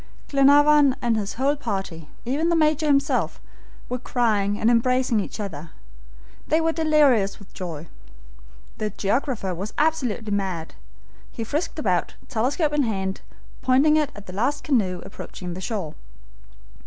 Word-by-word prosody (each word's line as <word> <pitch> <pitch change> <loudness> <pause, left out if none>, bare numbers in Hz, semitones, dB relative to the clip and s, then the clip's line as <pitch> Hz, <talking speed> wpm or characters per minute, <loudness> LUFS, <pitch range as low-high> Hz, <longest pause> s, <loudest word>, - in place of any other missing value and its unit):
Glenarvan 285 0 +5
and 235 -2 +1
his 210 -2 -3
whole 275 +4 +1
party, 195 - -5 0.2
even 290 +7 0
the 340 - +3
Major 310 -1 +2
himself, 280 -1 +1 0.5
were 250 +1 -3
crying 210 -5 0
and 225 - +3
embracing 250 0 +2
each 205 - -5
other. 170 -6 -6 0.8
They 315 - +3
were 325 0 +1
delirious 295 -11 +3
with 200 - -16
joy. 165 -3 -6 0.9
The 215 - -1
geographer 210 -1 -1
was 195 +5 -5
absolutely 260 -9 0
mad. 190 -5 -2 0.6
He 230 - -5
frisked 300 +10 -3
about, 185 - 0
telescope 285 +7 0
in 295 - +2
hand, 190 -6 -2 0.4
pointing 270 +4 +4
it 300 -2 +1
at 205 -1 -11
the 180 - -9
last 275 +9 -1
canoe 190 -10 0
approaching 180 -2 -8
the 185 - -7
shore. 190 -8 -3
235 Hz, 140 wpm, -24 LUFS, 195-290 Hz, 0.9 s, Glenarvan